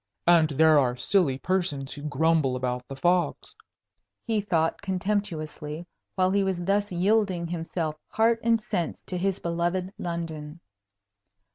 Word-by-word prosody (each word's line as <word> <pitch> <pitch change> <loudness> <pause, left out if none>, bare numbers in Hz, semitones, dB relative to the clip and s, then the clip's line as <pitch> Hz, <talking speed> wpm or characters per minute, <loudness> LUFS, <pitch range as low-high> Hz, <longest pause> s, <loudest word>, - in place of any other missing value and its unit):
"And 170 -2 +5
there 155 +1 +5
are 125 -2 +1
silly 160 -5 +2
persons 145 -5 -1
who 145 - -9
grumble 150 -2 +1
about 125 -1 -3
the 135 - -7
fogs!" 175 +5 0 0.7
he 220 -3 0
thought, 165 -5 0
contemptuously, 175 -5 -3 0.3
while 185 -1 +2
he 200 0 +2
was 190 -2 -1
thus 205 +1 +1
yielding 185 -1 +1
himself 165 -2 -3
heart 225 +1 +2
and 230 0 +3
sense 175 -5 -3
to 180 - -4
his 195 +1 0
beloved 175 +3 -2
London. 165 -2 -5
170 Hz, 135 wpm, -26 LUFS, 155-190 Hz, 0.7 s, And